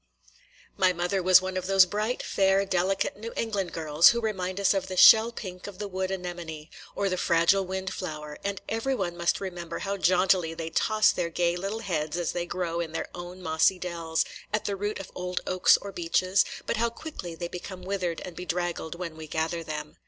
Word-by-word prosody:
My 185 -1 +4
mother 180 +2 -1
was 185 0 +6
one 185 0 -3
of 185 0 -3
those 195 -1 +6
bright, 215 +6 -2
fair, 195 0 +2
delicate 190 +1 0
New 225 +2 -7
England 205 -5 -1
girls 155 0 +5
who 235 - +1
remind 190 -4 -2
us 200 - +4
of 190 -1 -1
the 185 -1 -5
shell 220 +5 +8
pink 185 -5 -8
of 200 -2 -9
the 205 - -4
wood 190 -1 -3
anemone, 175 -4 -6 0.2
or 200 - 0
the 185 -1 -1
fragile 175 +3 +3
wind 190 0 -3
flower; 150 -4 -6
and 200 -1 -3
every 225 +4 -1
one 180 -6 -2
must 170 0 +1
remember 175 -3 -5
how 200 0 -3
jauntily 180 -2 +3
they 165 0 -5
toss 215 +5 +3
their 175 -2 -2
gay 170 +1 +1
little 195 +5 -4
heads 160 -5 -2
as 175 -2 -1
they 175 0 -3
grow 170 -2 -2
in 165 -2 -4
their - - -3
own 175 +1 -8
mossy 160 +3 +3
dells, 170 -2 -2 0.3
at 210 0 -1
the 200 - -1
root 205 +2 -3
of 195 - -8
old 180 0 -3
oaks 185 0 +5
or 200 - -8
beeches, 185 +2 +2 0.2
but - - -1
how 235 +1 +2
quickly 230 - -8
they 175 +1 -4
become 180 +1 -8
withered 185 -3 -2
and 180 - -9
bedraggled 175 -2 -3
when 170 -2 -6
we 160 0 -9
gather 160 +2 -2
them. 150 -1 -6
180 Hz, 205 wpm, -27 LUFS, 170-195 Hz, 0.3 s, shell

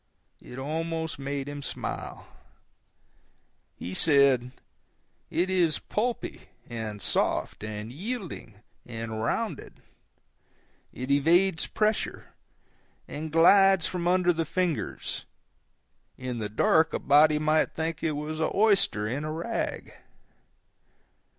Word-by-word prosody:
It 125 - -11
almost 160 +3 -3
made 140 0 -3
him 145 0 -6
smile. - - -5 1.5
He 90 - -6
said, 140 - +4 0.8
"It 175 +2 +1
is 180 -4 +2
pulpy, 235 +3 -3 0.2
and 110 -3 -5
soft, 95 - 0
and 110 +1 -5
yielding, 180 - -6 0.2
and 115 -2 -5
rounded; 115 - -3 1.1
it 130 +2 -5
evades 165 +5 +3
pressure, 215 0 -1 0.7
and 155 +1 -6
glides 190 +2 +6
from 175 -2 -2
under 180 0 +3
the 165 0 -1
fingers; 175 0 -2 0.9
in 125 -2 -4
the 105 -1 -3
dark 160 - +3
a - - -1
body 150 +2 +5
might 155 +1 +1
think 160 0 -3
it 155 - 0
was 150 +2 -4
an 160 - +1
oyster 195 - +3
in 130 +7 -3
a 155 - -3
rag." 170 +9 -3
155 Hz, 110 wpm, -27 LUFS, 130-175 Hz, 1.5 s, glides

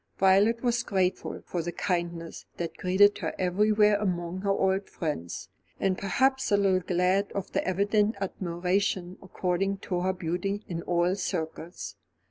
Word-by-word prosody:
Violet 200 +5 +4
was 240 -1 +2
grateful 190 -5 -1
for 175 - -2
the 175 +1 -3
kindness 170 -2 -3
that 170 -1 -4
greeted 195 +3 +4
her - - -3
everywhere 210 +3 +3
among 180 -2 -2
her 200 - -1
old 195 0 +1
friends, 150 - -4 0.3
and 190 -1 +1
perhaps 265 +7 +1
a 205 - +5
little 195 -2 +3
glad 185 +2 +1
of 200 - -4
the - - 0
evident 205 +3 +2
admiration 185 0 -1
accorded 190 +1 -1
to 180 - -1
her 190 +1 +1
beauty 185 +4 -2
in 170 -2 -4
all 175 +1 +1
circles. 170 -2 -4
190 Hz, 145 wpm, -28 LUFS, 175-200 Hz, 0.3 s, a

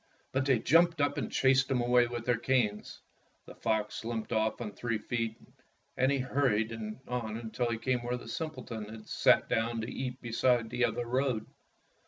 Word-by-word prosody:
But 135 0 0
they 130 -3 +5
jumped 165 +6 +4
up 145 +1 +1
and 120 - -4
chased 135 0 +3
him 130 -2 +1
away 120 0 +4
with 120 -1 -5
their 125 - +3
canes. 120 -5 0 0.4
The - - -11
fox 110 0 -1
limped 115 0 -3
off 110 0 +1
on 110 -3 -4
three 115 +2 -2
feet, 115 0 -3 0.6
and 130 +2 +3
he 140 - +2
hurried 125 -4 +1 0.3
on 115 -2 -4
till 120 -1 0
he 115 - -1
came 125 +2 0
to 120 - -7
where 125 0 0
the 125 - -11
simpleton 120 -6 -5
had 110 0 -10
sat - - +4
down 115 +1 0
to 110 - -5
eat 125 -1 -4
beside 120 -1 +1
the 125 0 +2
other 120 - -2
road. 125 -2 0
120 Hz, 190 wpm, -31 LUFS, 115-130 Hz, 0.6 s, they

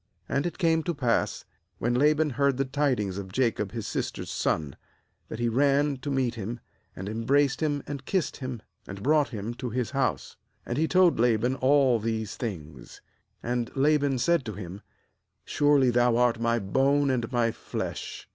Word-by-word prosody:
13 - - -2
And 140 +3 +1
it 170 - -6
came 165 -3 +2
to 170 +1 -3
pass, 125 -5 0 0.3
when 120 +1 0
Laban 150 +4 +3
heard 140 +1 +1
the 135 - +1
tidings 130 -9 0
of 95 -1 -8
Jacob 110 -3 0
his 115 -3 -5
sister's - - -4
son, 75 -4 -1 0.5
that - - -6
he 120 0 0
ran 140 +3 +2
to 130 +3 -6
meet 130 -3 0
him, 115 +1 -5 0.4
and 95 - -6
em 110 +2 -4
braced 140 +4 +2
him, 145 -2 0
and 140 -2 -6
kissed 185 +3 -1
him, 130 -5 -6 0.2
and 100 0 -8
brought 150 +1 +3
him 110 -1 -5
to 125 +1 -5
his 120 0 -2
house. 135 -2 -1 0.3
And 120 +4 -2
he 160 - +2
told 180 -5 +4
Laban 120 +1 +2
all 130 -2 +3
these 110 -1 -3
things. 80 - -7 0.4
14And 120 -1 -1
Laban 145 -1 +2
said 170 +4 +2
to 110 - -5
him: 95 0 -8 0.6
'Surely 145 -3 +3
thou 120 -1 +3
art 120 -1 +2
my 115 0 +1
bone 135 +7 +2
and 120 -2 -2
my 120 -2 +2
flesh.' - - -6
125 Hz, 180 wpm, -27 LUFS, 115-145 Hz, 0.6 s, told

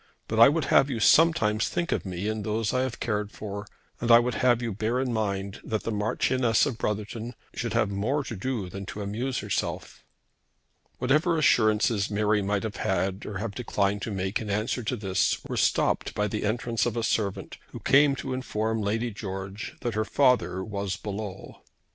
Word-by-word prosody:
But 110 - -1
I 115 - +10
would 155 -1 0
have 135 - +6
you 120 -4 -2
sometimes 115 -6 +4
think 175 0 -2
of - - -1
me 90 +2 -3
and 110 -1 -2
those 110 +1 -1
I 130 - +2
have 130 -2 -3
cared 105 -2 -2
for, 100 -1 -6 0.3
and 120 - -2
I 115 - +10
would 120 +1 +1
have 120 +1 +3
you 115 -3 -3
bear 110 +5 -1
in 130 -2 -1
mind 100 -2 -2
that 110 -1 -2
the 115 - -2
Marchioness 115 +2 +2
of 130 -6 -3
Brotherton 110 +3 -3 0.2
should - - -3
have 105 - +1
more 120 +9 0
to 120 - -6
do 110 -1 -3
than 95 +1 -7
to 105 - -5
amuse 120 +6 -2
herself." - - -3 0.9
Whatever 155 +7 +2
assurances 110 -6 +3
Mary 105 0 +1
might 100 0 -1
have 110 -2 -4
made 95 +1 -1
or 105 - -4
have 105 +1 -4
declined 100 -4 -1
to - - -3
make 95 +1 -2
in 105 - -5
answer 105 +5 -1
to 115 +2 -2
this 95 -4 0
were - - -4
stopped - - +1
by 105 0 +1
the 105 +1 -3
entrance 115 +1 0
of 120 -1 -3
a 115 - 0
servant, 105 -3 -1
who - - -9
came 140 +1 +4
to 130 0 -4
inform 110 -3 -2
Lady 115 +4 -1
George 100 -1 -6
that 120 - -2
her 110 +1 0
father 125 -6 +2
was 100 -2 -3
below. 100 -2 -7
110 Hz, 195 wpm, -27 LUFS, 100-120 Hz, 0.9 s, I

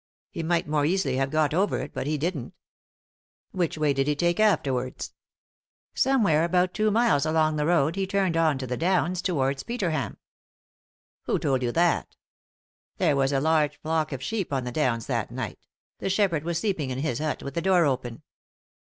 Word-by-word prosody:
He - - -4
might 170 0 0
more 150 -1 +1
easily 150 -5 +1
have 135 0 0
got 155 0 +1
over 195 +5 +1
it, - - -6
but - - -4
he 155 0 0
didn't" 150 -4 -3 1.0
"Which 175 -4 -1
way 150 -2 +2
did 135 +1 0
he 150 - +1
take 175 +4 0
afterwards? 130 -12 0 0.4
" - - -79 0.3
"Somewhere 215 - +3
about 180 +1 +1
two 215 0 +1
miles 220 -9 +3
along 155 0 +2
the 150 0 0
road 165 -2 +2
he 195 -1 -1
turned 195 -3 0
on 160 -4 +2
to 135 - -4
the 125 0 -3
downs 180 +1 +1
towards 135 -6 0
Peterham." 185 -10 -2 0.5
" - - -87
Who - - +1
told 135 -2 0
you 120 -1 0
that? 170 -1 +1 0.4
" - - -61
"There 145 - +2
was 135 0 +2
a 135 - +2
large 150 -1 +1
flock 160 -1 -1
of 135 -2 -5
sheep 200 +1 -3
on 135 -2 -1
the 125 - -4
downs 120 -5 0
that - - -2
night; - - -6 0.3
the - - -2
shepherd 190 -6 +1
was 170 0 -2
sleeping 175 -8 -1
in 130 - -3
his 135 -3 -2
hut 155 -1 -2
with 140 - -6
the 170 - -1
door 180 -2 +4
open. 125 -4 -2
155 Hz, 200 wpm, -26 LUFS, 140-180 Hz, 1.0 s, door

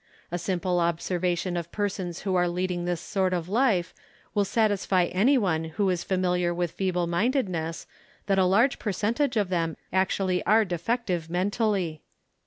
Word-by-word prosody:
A 175 - -2
simple 180 0 0
observation 175 +1 0
of 170 -1 -4
persons 190 -4 -3
who 195 -2 -1
are 180 -1 +3
leading 175 0 -2
this 175 -1 -1
sort 185 +1 -1
of 175 -2 -2
life 205 -5 +1 0.4
will 205 -1 +2
satisfy 200 -4 +2
any 220 +11 +3
one 170 -8 0
who 185 +4 0
is 175 -1 -2
familiar 180 -2 +1
with 175 -1 -1
feeble 180 -2 -1
minded 220 +9 +1
ness 165 -2 -4 0.4
that 195 -1 +2
a 185 - +4
large 230 +9 +3
percentage 230 +6 0
of 205 -3 +1
them 165 -3 -1 0.2
actually 190 -1 +1
are 220 +1 +4
de 175 -3 -3
fective 180 -5 -1
mentally. 185 -3 0
185 Hz, 165 wpm, -26 LUFS, 175-205 Hz, 0.4 s, a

